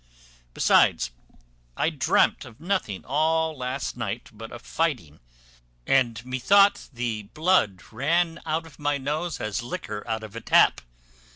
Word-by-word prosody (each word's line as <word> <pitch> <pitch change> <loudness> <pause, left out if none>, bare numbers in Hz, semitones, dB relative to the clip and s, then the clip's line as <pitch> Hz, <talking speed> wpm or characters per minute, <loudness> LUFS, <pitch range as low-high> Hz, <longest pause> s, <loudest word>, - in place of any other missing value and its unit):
besides, - - +3 0.7
I - - +1
dreamt - - +2
of 110 - -13
nothing 170 - -2
all 160 +3 +1
last 125 -3 -4
night - - -5
but 115 +1 -10
of 120 - -10
fighting; 125 - -2 0.7
and 120 -3 +1
methought 195 +11 +3
the 115 -5 -4
blood 155 - +2
ran 165 +4 0
out 160 +1 -2
of 160 - -16
my 145 -1 0
nose, 150 +3 -3
as 110 +3 -2
liquor 120 -3 -5
out 110 -1 -2
of 110 0 -10
a 115 - -5
tap. - - +4
130 Hz, 135 wpm, -25 LUFS, 115-160 Hz, 0.7 s, tap